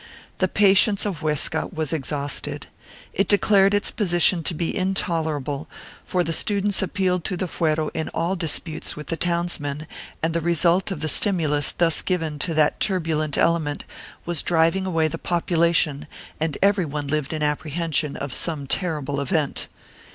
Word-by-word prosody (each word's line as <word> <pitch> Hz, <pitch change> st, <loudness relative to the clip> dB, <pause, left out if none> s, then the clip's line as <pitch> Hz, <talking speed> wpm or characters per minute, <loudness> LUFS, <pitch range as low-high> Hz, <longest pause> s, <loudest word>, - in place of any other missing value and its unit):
The 185 Hz, -, +3 dB
patience 200 Hz, +1 st, +4 dB
of 190 Hz, -7 st, -3 dB
Huesca 150 Hz, -2 st, 0 dB
was 155 Hz, -2 st, -2 dB
exhausted. 145 Hz, -1 st, -2 dB, 0.5 s
It 195 Hz, -, +1 dB
declared 200 Hz, -1 st, +4 dB
its 205 Hz, -, +1 dB
position 175 Hz, -3 st, +3 dB
to 170 Hz, -, 0 dB
be 165 Hz, +1 st, -2 dB
intolerable, 160 Hz, -6 st, -2 dB, 0.4 s
for 180 Hz, -1 st, 0 dB
the 165 Hz, -, -2 dB
students 200 Hz, +3 st, +1 dB
appealed 185 Hz, -2 st, 0 dB
to 185 Hz, -, -2 dB
the 185 Hz, -, -1 dB
fuero 155 Hz, -3 st, -1 dB
in 160 Hz, -, -3 dB
all 170 Hz, +3 st, -1 dB
disputes 165 Hz, -2 st, -1 dB
with 150 Hz, -, -9 dB
the 165 Hz, -, 0 dB
townsmen, 165 Hz, -4 st, -1 dB, 0.4 s
and 165 Hz, 0 st, +1 dB
the 170 Hz, -, 0 dB
result 170 Hz, +3 st, +2 dB
of 185 Hz, -7 st, -5 dB
the 160 Hz, -, 0 dB
stimulus 155 Hz, -4 st, +2 dB
thus 165 Hz, -2 st, +2 dB
given 160 Hz, -5 st, -2 dB
to 165 Hz, +2 st, 0 dB
that 155 Hz, -1 st, +2 dB
turbulent 160 Hz, -6 st, 0 dB
element 160 Hz, -3 st, +1 dB, 0.4 s
was 170 Hz, -3 st, 0 dB
driving 170 Hz, +3 st, +2 dB
away 165 Hz, -3 st, +1 dB
the 165 Hz, +1 st, -5 dB
population 170 Hz, -3 st, +1 dB, 0.3 s
and 155 Hz, -2 st, -1 dB
every 200 Hz, -1 st, +3 dB
one 150 Hz, -1 st, -4 dB
lived 150 Hz, -1 st, -1 dB
in 155 Hz, -1 st, -2 dB
apprehension 150 Hz, 0 st, -1 dB
of 140 Hz, -3 st, -5 dB
some 155 Hz, -2 st, 0 dB
terrible 145 Hz, -3 st, -1 dB
event. 145 Hz, +2 st, -1 dB
165 Hz, 160 wpm, -23 LUFS, 150-180 Hz, 0.5 s, patience